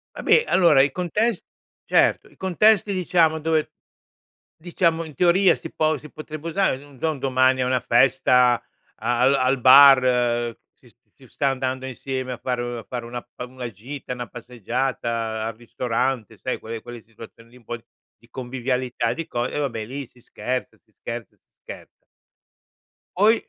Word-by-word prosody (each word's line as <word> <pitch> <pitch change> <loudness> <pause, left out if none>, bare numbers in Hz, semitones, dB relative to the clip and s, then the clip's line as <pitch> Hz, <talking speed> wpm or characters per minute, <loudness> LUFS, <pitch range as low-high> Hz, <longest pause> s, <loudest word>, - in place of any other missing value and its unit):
Vabbè, 465 - +3
allora, 165 -7 +5
i 140 - +2
contes 185 - -1 0.4
certo, - - +2
i - - -24
contesti, 205 +2 +3
diciamo, 170 -4 +2
dove 160 0 0 0.9
diciamo, 165 0 0
in 155 -2 -10
teoria, 180 +4 +4
si 165 - -9
po 155 0 +1
si 150 +3 -12
potrebbe 155 +1 -7
usare, 180 -4 +1
non 140 0 -16
so, 160 - 0
un 150 - -7
domani 130 0 +2
a - - +1
una 130 0 +1
festa, 125 0 +3 0.3
al 120 +4 +2
al 130 0 +1
bar, 125 -3 +6 0.2
si - - -22 0.2
si - - -18
sta 140 - -1
andando 130 0 -3
insieme 130 0 -4
a - - -7
fare 120 -1 -3
a - - -10
fare 120 -2 -6
una 120 +1 -6
pa 125 - -6
una 125 -1 -7
gita, 125 +6 -8
una 120 -1 -6
passeggiata, 115 -2 -3
al 115 -1 -4
ristorante, 120 0 -3
sai, 130 - -3
quelle 115 0 -7
quelle 120 0 -10
situazioni 115 +1 -15
lì 125 - -17
un 125 - -21
po' 120 +2 -5 0.4
di 115 - -24
convivialità 125 -1 -2
di 165 - -6
co 120 0 -2
ehm, 145 - -4
vabbè, 115 -7 -3
lì, 135 +3 -7
si 125 - -23
scherza, 125 +2 -5
si - - -38
scherza, - - -8
si - - -47 0.2
scherza. - - -12 1.1
Poi, 210 +4 +5
130 Hz, 165 wpm, -23 LUFS, 120-155 Hz, 1.1 s, bar